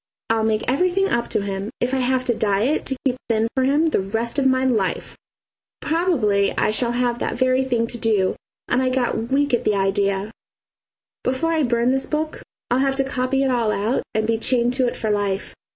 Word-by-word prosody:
I'll 225 0 +2
make 220 -1 +1
everything 365 +8 +1
up 235 0 -1
to 200 - -1
him, 195 +1 -4
if 250 +2 -1
I 265 - +1
have 255 0 +1
to 245 - +1
diet 215 +6 0
to 265 - -1
keep 255 -2 +1
thin 225 0 +2
for 260 - +1
him 285 +5 +3
the - - +1
rest 225 +7 -2
of 270 - +3
my 260 0 +2
life. 250 -4 -1 0.6
Probably 240 - +1
I - - +2
shall 235 +2 0
have 240 -1 0
that - - -2
very 255 +1 +2
thing 240 -3 0
to 235 +1 -3
do, 210 -4 +1 0.3
and 255 - +1
I 260 - +1
get 245 -2 -1
weak 285 0 +1
at 240 - +2
the 210 - +1
idea. 195 +1 0 0.9
Before 310 +6 0
I 320 - +1
burn 240 -2 +2
this 265 0 0
book 310 +1 -3 0.3
I'll 245 - +3
have 270 0 +1
to 270 - +2
copy 265 0 -1
it 265 - +1
all 235 -3 +1
out 215 +5 0
and 220 0 +1
be 225 0 0
chained 245 0 +2
to 255 -1 +1
it - - -3
for 220 - -1
life. 205 -1 -1
245 Hz, 215 wpm, -21 LUFS, 220-265 Hz, 0.9 s, him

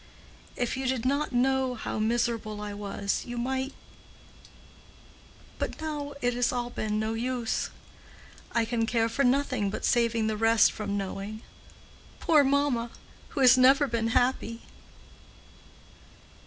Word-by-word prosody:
If 245 0 -1
you 265 0 -2
did 255 -2 -1
not 280 +3 0
know 260 0 +1
how 220 - -4
miserable 225 -1 -1
I 210 0 -5
was, 200 -1 -3
you 240 0 -7
might—but 265 +3 -9
now 295 -2 -4
it 245 0 +2
has 245 0 +1
all 245 -1 -3
been 215 -2 -2
no 220 +1 -1
use. 240 0 -2 0.8
I 235 -1 +1
can 230 -1 -1
care 230 -1 +2
for 275 +5 0
nothing 255 -5 +1
but 210 - -4
saving 230 -2 +2
the 220 0 0
rest 225 0 +4
from 205 -2 -3
knowing—poor 215 - -3
mamma, 275 -4 +1 0.4
who 275 - -3
has 255 0 +7
never 270 +3 +6
been 230 -2 -1
happy." 230 -1 0
240 Hz, 130 wpm, -28 LUFS, 220-260 Hz, 0.8 s, has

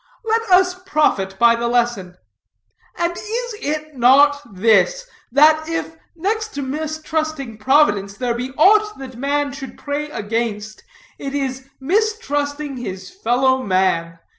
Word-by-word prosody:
Let 455 0 0
us 365 0 +5
profit 300 - 0
by 235 +2 +5
the 235 0 -1
lesson; 235 -7 -1 0.8
and 345 0 0
is 455 +6 -5
it 305 0 -4
not 280 +4 +5
this: 230 - +2 0.3
that 310 +4 +4
if, 330 0 -3 0.2
next 435 +6 -2
to 285 - -3
mistrusting 310 -3 -4
Providence, 205 -6 +2
there 245 -2 -1
be 245 +2 -4
aught 425 +6 +4
that 260 -2 -9
man 280 +3 -1
should 270 -2 -9
pray 295 +1 -4
against, 215 -2 -3 0.4
it 275 0 -5
is 265 -2 -2
against 265 +1 -26
mistrusting 295 - -1
his 190 -6 -7
fellow 260 - +1
man. 185 -5 0
280 Hz, 135 wpm, -20 LUFS, 235-315 Hz, 0.8 s, us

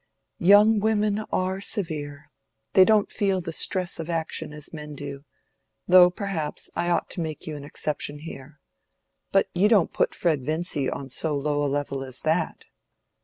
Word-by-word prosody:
"Young 205 +4 +6
women 210 -1 +1
are 185 +1 -1
severe: 150 -7 -4 0.4
they 190 - +8
don't 210 +1 +3
feel 195 -2 +1
the 165 -2 -5
stress 180 +2 -1
of 165 0 -5
action 165 -2 -2
as 150 +1 -8
men 150 -1 -7
do, 140 -1 -7 0.7
though 180 0 +8
perhaps 180 -5 -4
I 175 0 -1
ought 175 - 0
to 175 - -4
make 155 -2 -5
you 155 - -5
an 145 - -8
exception 145 0 -4
there. 145 -1 -10 0.7
But 195 - +3
you 185 +4 +3
don't 205 -7 +3
put - - +1
Fred 155 -6 0
Vincy 155 -2 -1
on 140 - -5
so 145 +3 -1
low 145 +1 0
a 145 - +1
level 140 -1 -2
as 130 -2 -6
that?" 160 +1 -1
160 Hz, 170 wpm, -25 LUFS, 145-185 Hz, 0.7 s, they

